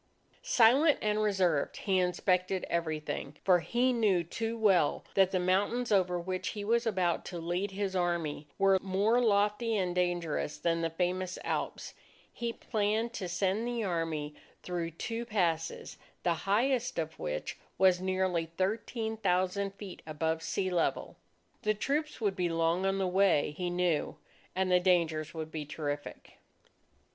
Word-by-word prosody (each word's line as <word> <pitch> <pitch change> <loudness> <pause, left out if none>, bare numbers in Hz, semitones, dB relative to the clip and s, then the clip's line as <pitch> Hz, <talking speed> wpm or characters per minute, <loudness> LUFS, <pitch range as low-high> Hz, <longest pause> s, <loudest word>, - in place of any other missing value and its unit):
Silent 290 - +5
and 210 0 +1
reserved, 185 -8 +1
he 190 -2 +1
inspected 185 +1 +1
everything. 155 -3 -3
For 180 -2 +5
he 245 +9 +1
knew 205 -7 +2
too 225 +7 -3
well 195 -9 +3
that 190 -1 +4
the 185 - 0
mountains 205 +7 +1
over 180 -3 +2
which 185 +1 -3
he 205 - -3
was 235 +3 +1
about 185 -5 +1
to 175 - -6
lead 175 +4 -2
his 195 0 -3
Army, 170 -5 -1
were 195 -1 +4
more 200 +5 +2
lofty 210 +1 +2
and 180 -2 0
dangerous 175 -4 -1
than 165 +1 0
the 165 - 0
famous 180 +2 -2
Alps. - - -3 0.4
He 235 -1 -3
planned 220 +1 -1
to 185 -6 -4
send 195 +5 0
the 240 -2 -2
Army 165 -5 -2 0.3
through 175 -2 -3
two 225 +8 -4
passes, 175 -8 -1 0.3
the 175 - +3 0.2
highest 250 +4 +1
of 160 0 -3
which 75 0 -4 0.2
was 185 -1 +4
nearly 185 -3 0
13,000 200 -2 -1
feet 200 -3 -9
above 160 +1 -1
sea 185 +3 -1
level. 175 -2 0 0.5
The 215 0 +1
troops 295 +8 -2
would 205 -4 0
be 180 -2 0
long 165 +3 +1
on 195 0 +1
the 195 - 0
way, 185 -5 +3
he 180 +1 -2
knew, 175 -3 0 0.4
and 185 0 +1
the 180 - +6
dangers 165 -4 +1
would 160 -1 -5
be 155 -1 -4
terrific. 145 -1 -6
185 Hz, 150 wpm, -31 LUFS, 170-210 Hz, 0.5 s, the